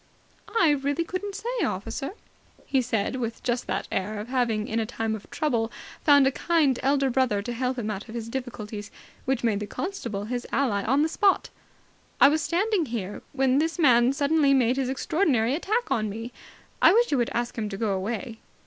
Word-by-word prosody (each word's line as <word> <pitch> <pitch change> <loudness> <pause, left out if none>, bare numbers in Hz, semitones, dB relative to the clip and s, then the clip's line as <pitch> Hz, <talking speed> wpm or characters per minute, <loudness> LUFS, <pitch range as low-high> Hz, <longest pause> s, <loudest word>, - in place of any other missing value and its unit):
"I 325 -3 +5
really 285 +3 0
couldn't 380 +4 -5
say, 480 +2 -2
officer," 225 - -3 0.5
he 265 - +2
said, 230 0 -1
with 230 -2 -4
just 240 0 -1
that - - -2
air 205 +3 -2
of 215 +3 -7
having 235 -5 0
in 225 - -1
a 225 - 0
time 225 -1 -2
of 215 -2 -7
trouble 240 -7 0 0.3
found 285 -2 +6
a 265 - +3
kind 300 -4 +2
elder 275 -1 +2
brother 235 -6 +1
to 240 - -4
help 255 +2 -1
him 220 -3 -2
out 210 +3 -6
of 225 - -8
his 230 -1 -4
difficulties 230 -4 -6 0.4
which 260 -2 0
made 220 -4 +1
the 210 - -5
constable 235 - -4
his 245 +2 -4
ally 235 -8 +1
on 270 +6 +3
the - - +2
spot. 395 +4 +2 0.7
"I - - +8
was 310 +2 +1
standing 360 +1 +1
here, 210 -4 -4
when 270 0 +2
this 325 +3 0
man 250 -6 +5
suddenly 285 0 +3
made 250 0 +2
his 265 -2 0
extraordinary 270 - +1
attack 430 - -1
on 215 -5 +1
me. 225 +4 -6 0.5
I - - +7
wish 475 -1 +3
you 280 - +2
would 240 - +1
ask 240 0 -2
him 215 -2 -3
to 195 - -5
go 215 -1 0
away." 225 +4 -4
250 Hz, 200 wpm, -26 LUFS, 225-290 Hz, 0.7 s, I